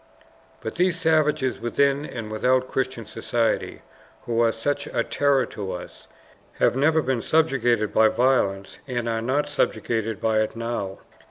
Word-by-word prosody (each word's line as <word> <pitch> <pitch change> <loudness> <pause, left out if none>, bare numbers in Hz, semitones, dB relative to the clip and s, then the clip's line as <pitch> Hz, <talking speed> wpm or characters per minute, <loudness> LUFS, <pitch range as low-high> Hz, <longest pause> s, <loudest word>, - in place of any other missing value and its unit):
But 110 - -6
these 180 0 +2
savages 150 -4 +2
within 140 +5 +1
and 115 -3 -6
without 130 +4 +1
Christian 130 -4 -2
society, 115 -1 -2 0.4
who 120 -3 -1
are 115 -1 +4
such 115 +6 -2
a 115 - -1
terror 140 -1 +2
to 95 -3 -6
us, 90 - -9 0.5
have - - +2
never 155 +3 +3
been 130 -2 0
subjugated 120 -9 +1
by 110 0 +5
violence, 110 -5 +1
and 120 -3 -2
are 115 -1 -1
not 140 +5 0
subjugated 115 -6 -1
by 110 -1 +2
it 110 - -2
now. 115 -4 -4
120 Hz, 150 wpm, -24 LUFS, 115-140 Hz, 0.5 s, by